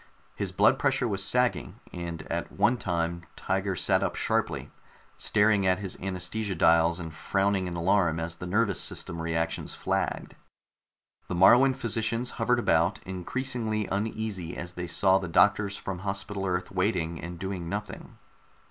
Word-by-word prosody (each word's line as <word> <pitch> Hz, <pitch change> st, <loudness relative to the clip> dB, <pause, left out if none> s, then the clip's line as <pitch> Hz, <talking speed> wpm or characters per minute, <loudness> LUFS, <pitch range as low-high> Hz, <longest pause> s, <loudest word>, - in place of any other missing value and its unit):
His -, -, -3 dB
blood -, -, +4 dB
pressure 125 Hz, -, +1 dB
was 100 Hz, -3 st, 0 dB
sagging, 125 Hz, +4 st, 0 dB
and 85 Hz, -2 st, -5 dB
at 85 Hz, +2 st, -4 dB
one 105 Hz, +5 st, +2 dB
time 85 Hz, -3 st, -2 dB
Tiger 95 Hz, 0 st, -1 dB
sat -, -, +2 dB
up -, -, -1 dB
sharply, -, -, -1 dB, 0.4 s
staring 105 Hz, -2 st, +2 dB
at 90 Hz, 0 st, +3 dB
his 95 Hz, -2 st, -5 dB
anaesthesia 95 Hz, +2 st, -2 dB
dials 85 Hz, +1 st, +4 dB
and 80 Hz, -2 st, -6 dB
frowning 95 Hz, +2 st, 0 dB
in 85 Hz, -, -5 dB
alarm 85 Hz, -1 st, +2 dB
as 85 Hz, +1 st, -3 dB
the 90 Hz, -, -6 dB
nervous 105 Hz, 0 st, +1 dB
system 85 Hz, -, -2 dB
reactions 80 Hz, 0 st, -2 dB
flagged. -, -, -2 dB, 0.9 s
The -, -, -3 dB
Moruan 125 Hz, +9 st, +6 dB
physicians 115 Hz, 0 st, -1 dB
hovered 125 Hz, +2 st, +3 dB
about, 120 Hz, -, +2 dB
increasingly 110 Hz, +3 st, -2 dB
uneasy 100 Hz, -4 st, -3 dB
as 90 Hz, 0 st, -6 dB
they 90 Hz, 0 st, -5 dB
saw 95 Hz, +3 st, +3 dB
the 95 Hz, -, -5 dB
doctors 100 Hz, +3 st, +3 dB
from 95 Hz, -2 st, -5 dB
Hospital 100 Hz, +1 st, -3 dB
Earth 90 Hz, 0 st, -2 dB
waiting 90 Hz, -4 st, -1 dB
and 85 Hz, +1 st, -7 dB
doing 95 Hz, -2 st, -4 dB
nothing. 105 Hz, +3 st, -6 dB
95 Hz, 150 wpm, -28 LUFS, 85-105 Hz, 0.9 s, Moruan